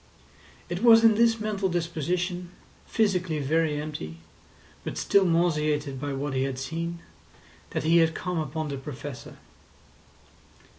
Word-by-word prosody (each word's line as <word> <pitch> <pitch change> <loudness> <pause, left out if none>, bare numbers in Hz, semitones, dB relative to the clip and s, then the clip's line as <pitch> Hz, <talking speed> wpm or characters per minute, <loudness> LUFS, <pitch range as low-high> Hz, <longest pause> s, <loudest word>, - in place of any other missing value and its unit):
It 175 +2 -4
was 230 -1 +7
in 225 -1 +7
this 230 +1 +3
mental 205 -3 -1
disposition, 175 +1 -2 0.4
physically 185 -7 +1
very 150 +1 +1
empty, 145 - -6 0.7
but - - -5
still 200 -1 +3
nauseated 150 -5 +1
by 145 -1 -2
what 135 +1 -3
he 130 - 0
had 135 -1 -2
seen, 165 +5 -4 0.7
that - - -3
he 165 +2 +4
had 165 -1 +3
come 180 -2 -2
upon 155 +1 -3
the 140 - -3
Professor. 135 -1 -8
165 Hz, 135 wpm, -27 LUFS, 145-180 Hz, 0.7 s, was